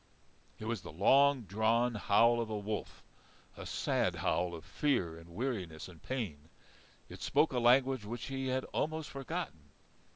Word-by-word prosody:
It 110 - -8
was 115 -2 -2
the - - -9
long 135 - +4
drawn 110 +5 +2
howl 115 +3 +4
of 115 - -4
a 110 - -2
wolf, 105 +1 -5 0.5
a - - -8
sad - - 0
howl 90 -1 0
of 80 -2 -10
fear 110 - 0
and 85 +1 -13
weariness 95 - -3
and 85 -4 -14
pain. 85 - -4 0.6
It - - -11
spoke 150 +1 +2
a 125 - +1
language 130 0 +4
which 115 +4 -5
he 135 -1 -3
had 130 0 0
almost 155 0 -2
forgotten. 135 - -5
115 Hz, 160 wpm, -33 LUFS, 95-135 Hz, 0.6 s, long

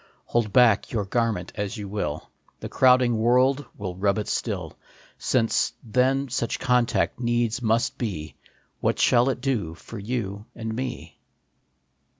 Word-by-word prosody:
Hold 115 -3 0
back 120 -2 +4
your 105 -4 -1
garment 110 -4 -1
as 105 +3 -4
you 105 -1 -6
will, 100 -7 -4 0.3
The - - -6
crowding 125 -3 +4
world 130 +4 +3
will 95 -4 -5
rub 100 +2 +1
it 105 - -3
still. - - -2 0.6
Then, 115 -3 +3
since - - 0 0.6
such 120 -2 -1
contact 125 -2 +1
needs 120 -1 0
must 115 0 +1
be, 90 -10 -4 0.5
What - - 0
shall 125 +1 +4
it 125 -2 -2
do 110 -12 -1
for 115 +5 -10
you 105 -2 -4
and 110 -1 -4
me 125 0 -5
115 Hz, 145 wpm, -25 LUFS, 100-125 Hz, 0.6 s, back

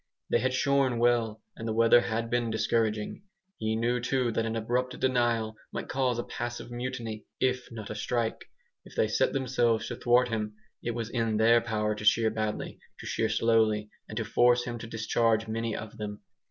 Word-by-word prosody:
They - - +4
had 130 0 0
shorn 135 -2 +2
well, 115 -2 +2
and 115 - -6
the 110 - 0
weather 115 +1 +6
had 115 0 -2
been 120 -1 +1
discouraging. 110 - 0 0.4
He 110 0 0
knew 120 +2 +1
too 125 0 0
that 115 0 0
an 115 - -2
abrupt 125 +3 -1
denial 120 -4 +1 0.2
might - - -5
cause 130 -3 +1
a 120 - -1
passive 120 0 -5
mutiny, 120 -3 -5
if 125 -1 0
not 110 -3 -7
a - - -2
strike. 115 +1 -2 0.4
If - - -15
they 110 - +3
set 120 +5 +2
themselves 120 -4 +1
to 120 - -3
thwart 125 +1 +3
him, 105 -2 -2 0.3
it 120 -1 -3
was 115 -1 -4
in 115 -3 0
their 115 +2 +5
power 105 -2 -1
to 105 - -7
shear 110 +1 +4
badly, 110 -1 -3 0.2
to - - -9
shear 110 - 0
slowly, 110 -1 +2 0.2
and - - -6
to - - -1
force 120 0 +4
him 120 -1 -5
to 115 - -7
discharge 115 0 +1
many 115 0 -2
of 110 -1 -7
them. 105 -1 -5
115 Hz, 195 wpm, -29 LUFS, 110-120 Hz, 0.4 s, weather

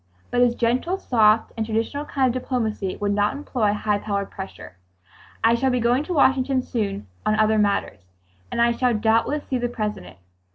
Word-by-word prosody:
But 245 - +2
his 240 -1 +3
gentle, 250 +11 0
soft 220 - +3
and 225 - -1
traditional 225 +7 -2
kind 270 -3 0
of 255 - -2
diplomacy 220 -7 -2
would 205 0 -1
not 205 0 +1
employ 250 -7 0
high 210 0 0
powered 200 -1 -3
pressure. 190 - -9 0.7
"I 225 +1 +5
shall 255 +3 +1
be 250 -1 +1
going 240 +4 +2
to 360 - -3
Washington 265 -2 +3
soon 200 - -3 0.2
on 215 - +2
other 215 0 +3
matters, 200 - 0 0.5
and - - -3
I 235 0 +4
shall 245 0 +1
doubtless 230 +7 +1
see 255 - -1
the 245 0 -1
President. 210 - -5
230 Hz, 180 wpm, -23 LUFS, 210-255 Hz, 0.7 s, I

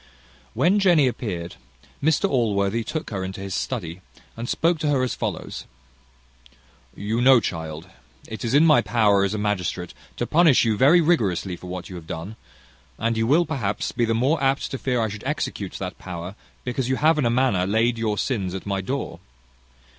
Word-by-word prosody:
When 190 +5 +3
Jenny 175 -7 +5
appeared, 90 -9 -3 0.4
Mr 155 +1 +2
Allworthy 110 -3 +1
took 155 +4 -5
her 95 -3 -3
into 95 +1 -6
his 95 -1 -5
study, 90 -8 -4 0.3
and 115 +1 -5
spoke 165 0 +1
to 150 - -1
her 135 -3 +2
as 130 - -1
follows: - - -4 1.3
"You 110 +4 -2
know, 130 0 +7
child, 80 -4 -5 0.4
it 110 +3 -7
is 115 +3 0
in 150 +3 +6
my 155 -2 +6
power 105 -4 +3
as 100 +2 0
a - - -2
magistrate, 95 -4 -2 0.2
to - - -1
punish 155 -7 +4
you 110 -2 +2
very 145 +10 +5
rigorously 100 - +1
for 90 - -11
what 90 0 -6
you 90 - -8
have 80 -2 -11
done; 85 +7 -6 0.6
and 115 +1 0
you 115 0 0
will, 160 +7 +4
perhaps, 115 -10 -2
be 120 - 0
the 115 0 0
more 135 +8 +1
apt 135 0 +1
to 135 - -4
fear 125 -2 0
I 110 - +1
should 105 0 -7
execute 130 -8 -3
that 95 -1 -6
power, 90 0 -7 0.3
because 125 0 -2
you 130 - +2
have 155 +3 +3
in 140 - +1
a - - +2
manner 120 -7 +2
laid 115 +3 +1
your 110 -2 -1
sins 95 -8 -2
at 95 - -6
my 100 -1 -1
door. 135 +9 -4
115 Hz, 190 wpm, -23 LUFS, 95-135 Hz, 1.3 s, know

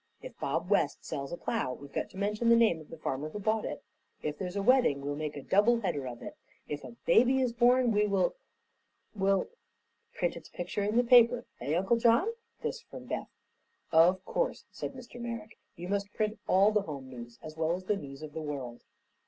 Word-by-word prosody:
If - - -10
Bob - - -1
West - - +1
sells 140 -1 -4
a 175 - -4
plow 130 -6 -1
we've 140 +1 -11
got - - -2
to - - -13
mention 210 +4 0
the 235 - +8
name 220 -9 +4
of 155 - -15
the 165 - -9
farmer 150 0 -3
who 180 - -7
bought 215 +1 0
it; - - -5 0.4
if 150 -1 -2
there's 180 0 -4
a 200 - 0
wedding, 245 - +4
we'll 145 +1 -3
make 150 0 -4
a 140 - -7
double 230 +4 +4
header 145 - -2
of 120 -1 -7
it; - - -7 0.3
if 145 0 -5
a 125 -3 -9
baby 250 +8 +5
is 250 -3 +1
born, 245 +1 +4
we 210 0 +3
will 195 -2 +2 0.8
will 195 -1 +2 0.3
" - - -46
"Print 175 -1 0
its 165 -2 -10
picture 180 +3 -3
in 210 +3 0
the 245 - +5
paper. 240 0 +6
Eh, 150 - -1
Uncle 190 +7 +2
John?" 235 - +4 0.3
This 485 - -3
from - - -11
Beth. - - -4 0.6
"Of 170 +4 +5
course," - - -1
said - - -5
Mr. 245 -1 -10
Merrick. 230 -2 -6 0.2
"You 175 +1 -7
must 200 +1 -1
print 215 0 -1
all 195 +3 +5
the 210 -1 +2
home 140 -8 -7
news, 120 -2 -10
as 155 0 -8
well 160 +1 +1
as 185 - -7
the 205 +3 +1
news 140 -5 -8
of 150 -1 -8
the 160 - -4
world." 135 -6 -5
195 Hz, 220 wpm, -30 LUFS, 150-230 Hz, 0.8 s, the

